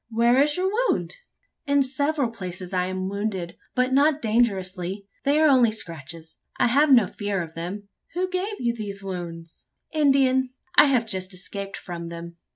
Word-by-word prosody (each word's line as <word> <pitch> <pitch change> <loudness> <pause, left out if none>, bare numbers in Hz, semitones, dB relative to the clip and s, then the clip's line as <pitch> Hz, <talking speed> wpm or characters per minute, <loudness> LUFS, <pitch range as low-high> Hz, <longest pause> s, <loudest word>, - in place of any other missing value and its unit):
Where 235 +3 +4
is 295 +2 +2
your 375 +1 +1 0.2
wound?" - - -1 0.5
"In 285 0 +4
several 280 -1 0
places 185 -3 -6
I 180 -1 +1
am 185 0 -3
wounded; 195 -3 -3 0.2
but 255 +1 +1
not 290 +2 +4
dangerously. 195 - 0 0.2
They 285 +2 +3
are 315 - +5
only 255 -5 +5
scratches: 165 -5 -7 0.2
I - - +3
have 285 +4 +4
no 240 -6 +7
fear 205 +1 -3
of 160 -1 -10
them." 185 +5 -6 0.3
"Who 365 +1 0
gave 375 +3 -3
you 240 -1 0
these 200 -3 -6
wounds?" 170 -3 -7 0.2
"Indians. 265 -3 +2 0.2
I - - +9
have 255 -5 +2
just 185 -3 -3
escaped 195 +2 -6
from 170 -2 -7
them." 170 0 -8
215 Hz, 165 wpm, -24 LUFS, 185-270 Hz, 0.5 s, I